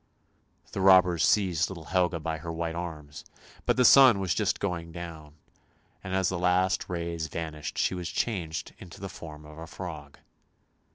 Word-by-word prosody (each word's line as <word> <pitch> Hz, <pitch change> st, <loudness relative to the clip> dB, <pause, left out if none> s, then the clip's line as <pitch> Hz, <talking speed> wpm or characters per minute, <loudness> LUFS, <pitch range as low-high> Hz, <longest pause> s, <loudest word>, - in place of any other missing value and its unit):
The 95 Hz, -, -3 dB
robbers 90 Hz, -3 st, +5 dB
seized 90 Hz, -6 st, +2 dB
little 85 Hz, -5 st, -8 dB
Helga 90 Hz, -1 st, +1 dB
by 80 Hz, 0 st, -3 dB
her 85 Hz, +2 st, -6 dB
white 80 Hz, 0 st, -3 dB
arms, 80 Hz, -4 st, -7 dB, 0.4 s
but -, -, +2 dB
the 125 Hz, -, +4 dB
sun 130 Hz, -7 st, +8 dB
was 95 Hz, -3 st, 0 dB
just -, -, 0 dB
going 85 Hz, -4 st, -3 dB
down, 80 Hz, -3 st, -9 dB, 0.7 s
and 95 Hz, 0 st, -3 dB
as 95 Hz, -2 st, +2 dB
the 90 Hz, -1 st, -2 dB
last 90 Hz, +1 st, +1 dB
rays 85 Hz, -2 st, -3 dB
vanished 80 Hz, -2 st, -6 dB
she -, -, +1 dB
was 90 Hz, -2 st, -4 dB
changed 85 Hz, -8 st, -3 dB
into 90 Hz, -, -12 dB
the 95 Hz, 0 st, -6 dB
form 80 Hz, -7 st, -10 dB
of 75 Hz, +1 st, -12 dB
a 80 Hz, -, -8 dB
frog. 80 Hz, -5 st, -8 dB
85 Hz, 170 wpm, -28 LUFS, 80-95 Hz, 0.7 s, sun